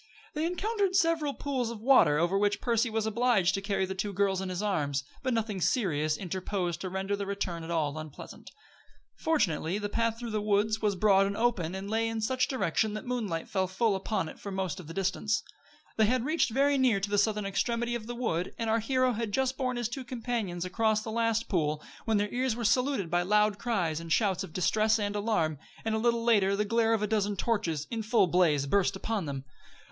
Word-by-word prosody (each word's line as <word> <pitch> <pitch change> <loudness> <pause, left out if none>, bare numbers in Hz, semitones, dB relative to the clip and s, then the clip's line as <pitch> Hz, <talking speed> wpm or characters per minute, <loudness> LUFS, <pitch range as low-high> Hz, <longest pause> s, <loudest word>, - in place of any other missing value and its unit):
They 310 +2 0
encountered 390 +1 -1
several 325 -6 +2
pools 260 -5 -2
of 230 -2 -6
water 230 - +5
over 170 +4 +1
which 205 +1 +2
Percy 235 0 +1
was 220 -1 -1
obliged 220 -4 +2
to 195 - -1
carry 195 -1 0
the 190 - -4
two 200 +2 -3
girls 195 -1 +1
in 190 - -4
his 185 +2 -3
arms; 145 -8 0 0.2
but 260 - -1
nothing 220 -5 -1
serious 155 - +1
interposed 180 -2 -3
to 185 - -3
render 190 +2 -2
the 200 -1 -4
return 185 -4 -3
at 160 - -8
all 155 -4 0
unpleasant. 155 -2 -10 0.7
Fortunately 190 - 0
the 205 0 -3
path 230 +1 0
through 235 -1 -6
the 215 -1 -1
woods 210 +1 +1
was 210 -2 +1
broad 195 0 +4
and 200 +1 -3
open, 200 -8 0
and 190 +1 -5
lay 225 +2 0
in 225 0 -2
such 255 +4 +1
direction 215 - 0
that 215 - -4
the - - -14
moonlight 210 -10 -2
fell 190 -2 0
full 195 +3 +1
upon 190 -2 -2
it - - -10
for 200 - -7
most 190 -1 -3
of 175 - -10
the 165 - -7
distance. 195 +3 0 0.5
They 220 -1 +4
had 250 +1 +1
reached 310 -2 +2
very 275 +4 +2
near 245 -6 +3
to 200 +1 -3
the 205 - +3
southern 210 0 +1
extremity 235 +4 -1
of 230 -2 -4
the 240 - -5
wood, 185 -8 -2
and 230 -1 -1
our 225 - +3
hero 255 +3 +1
had 225 -1 -3
just 265 +3 0
borne 255 -2 -2
his 240 -2 -1
two 260 +3 -6
companions 230 -8 -3
across 215 +3 +1
the 220 - -5
last 230 0 0
pool, 155 -5 0 0.2
when 225 -2 +2
their 205 0 -1
ears 250 -1 0
were 235 -1 -3
saluted 250 -5 +1
by 175 0 +3
loud 210 +2 +2
cries 175 -10 -1
and 165 0 -8
shouts 195 -1 +2
of 190 - -8
distress 215 +5 +2
and 205 -1 -2
alarm, 170 -9 0 0.3
and 220 - 0
a 220 - +1
little 235 0 +1
later 205 -4 +3
the 210 +1 0
glare 225 +1 +2
of 215 - -2
a - - +3
dozen 205 -1 0
torches, 180 -9 -1
in 230 -1 -2
full 220 -1 +3
blaze, 165 -5 +2
burst 195 +6 +2
upon 200 -3 -2
them. 135 -1 -5
210 Hz, 225 wpm, -29 LUFS, 190-235 Hz, 0.7 s, water